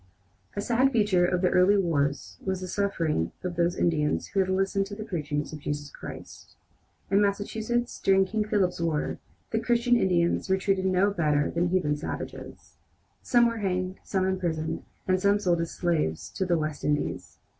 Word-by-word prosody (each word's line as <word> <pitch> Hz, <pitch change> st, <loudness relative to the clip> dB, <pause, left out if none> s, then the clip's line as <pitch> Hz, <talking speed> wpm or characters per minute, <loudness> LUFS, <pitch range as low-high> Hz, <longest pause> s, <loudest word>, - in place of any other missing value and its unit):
A 205 Hz, -, -1 dB
sad 250 Hz, +5 st, +2 dB
feature 205 Hz, -7 st, +3 dB
of 180 Hz, 0 st, 0 dB
the 180 Hz, -, +3 dB
early 185 Hz, +3 st, +5 dB
wars 145 Hz, -7 st, -1 dB
was 190 Hz, -1 st, -1 dB
the 185 Hz, -, -4 dB
sufferings 170 Hz, -, 0 dB
of 180 Hz, -1 st, -3 dB
those 175 Hz, +1 st, +1 dB
Indians 150 Hz, -3 st, +1 dB
who 195 Hz, -, -1 dB
had 190 Hz, -1 st, +2 dB
listened 195 Hz, +1 st, +1 dB
to 205 Hz, -, -7 dB
the 215 Hz, -, -6 dB
preaching 150 Hz, -7 st, -2 dB
of 150 Hz, +1 st, -8 dB
Jesus 145 Hz, 0 st, -4 dB
Christ. -, -, -10 dB, 0.6 s
In 200 Hz, +1 st, +4 dB
Massachusetts, 220 Hz, +4 st, -1 dB
during 195 Hz, 0 st, +4 dB
King 215 Hz, +3 st, -1 dB
Philip's 190 Hz, -5 st, +1 dB
war, 160 Hz, -3 st, -1 dB, 0.3 s
the 225 Hz, -, +1 dB
Christian 240 Hz, +1 st, +2 dB
Indians 175 Hz, -3 st, +1 dB
were 190 Hz, -, +3 dB
treated 190 Hz, 0 st, 0 dB
no 190 Hz, +2 st, +3 dB
better 150 Hz, -6 st, +1 dB
than 170 Hz, +1 st, +1 dB
the -, -, 0 dB
"heathen 170 Hz, -5 st, +1 dB
savages." 150 Hz, -, -7 dB, 0.4 s
Some 240 Hz, -1 st, +4 dB
were 230 Hz, 0 st, -2 dB
hanged, 185 Hz, -1 st, -2 dB
some 190 Hz, -1 st, 0 dB
imprisoned, 170 Hz, -4 st, -1 dB, 0.3 s
and 185 Hz, 0 st, +2 dB
some 200 Hz, +1 st, +4 dB
sold 175 Hz, -5 st, +1 dB
as 165 Hz, -, -2 dB
slaves 160 Hz, -, -1 dB
to 190 Hz, -, -2 dB
the 175 Hz, -1 st, +2 dB
West 155 Hz, -1 st, -3 dB
Indies. 150 Hz, 0 st, -2 dB
185 Hz, 180 wpm, -27 LUFS, 165-200 Hz, 0.6 s, early